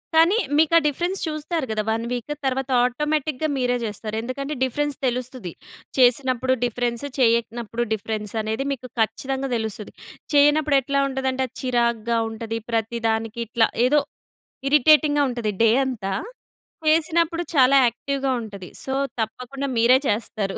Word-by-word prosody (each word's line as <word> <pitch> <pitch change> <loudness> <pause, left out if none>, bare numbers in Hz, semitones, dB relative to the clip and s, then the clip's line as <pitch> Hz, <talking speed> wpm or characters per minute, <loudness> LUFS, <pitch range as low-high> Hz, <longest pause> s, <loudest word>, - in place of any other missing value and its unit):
కానీ 335 +6 +5 0.2
మీకు 320 +1 +3
ఆ - - +8
డిఫరెన్స్ 350 +6 -1
చూస్తారు 310 0 -2
గదా! 215 -1 -1
1 225 +1 -1
వీక్. 250 +4 -3
తర్వాత 265 0 -1
ఆటోమేటిక్‌గా 300 +3 -1
మీరే 250 -1 +1
జేస్తారు. 215 0 -5
ఎందుకంటే 275 +5 -4
డిఫరెన్స్ 290 +2 -1
తెలుస్తది. 250 -5 -3 0.5
చేసినప్పుడు 260 0 +3
డిఫరెన్స్, 240 +2 -1
చెయ్యనప్పుడు 235 -1 +1
డిఫరెన్స్ 215 -1 -4
అనేది 220 +5 -2
మీకు 255 -2 -5
ఖచ్చితంగా 265 +4 -1
తెలుస్తది. 220 -2 -5 0.4
చేయనప్పుడు 295 0 +4
ఎట్లా 280 +1 0
ఉంటదంటే 265 0 -1
అది 255 - -30
చిరాగ్గా 235 -2 +1
ఉంటది. 225 0 -5
ప్రతి 230 +1 -1
దానికి 225 +1 -2
ఇట్లా 230 0 +3 0.2
ఏదో 295 +3 +4 0.7
ఇరిటేటింగ్‌గా 295 0 +5
ఉంటది 235 -4 -2
డే 225 - +6
అంతా. 210 -7 -3 0.8
చేసినప్పుడు 330 +2 +2
చాలా 270 +1 +6
యాక్టివ్‌గా 270 +3 -2
ఉంటది. 200 -4 -9
సో 265 - -3 0.3
తప్పకుండా 250 +5 -4
మీరే 245 +3 +6
చేస్తారు. 205 -2 -2
255 Hz, 130 wpm, -23 LUFS, 225-280 Hz, 0.8 s, ఆ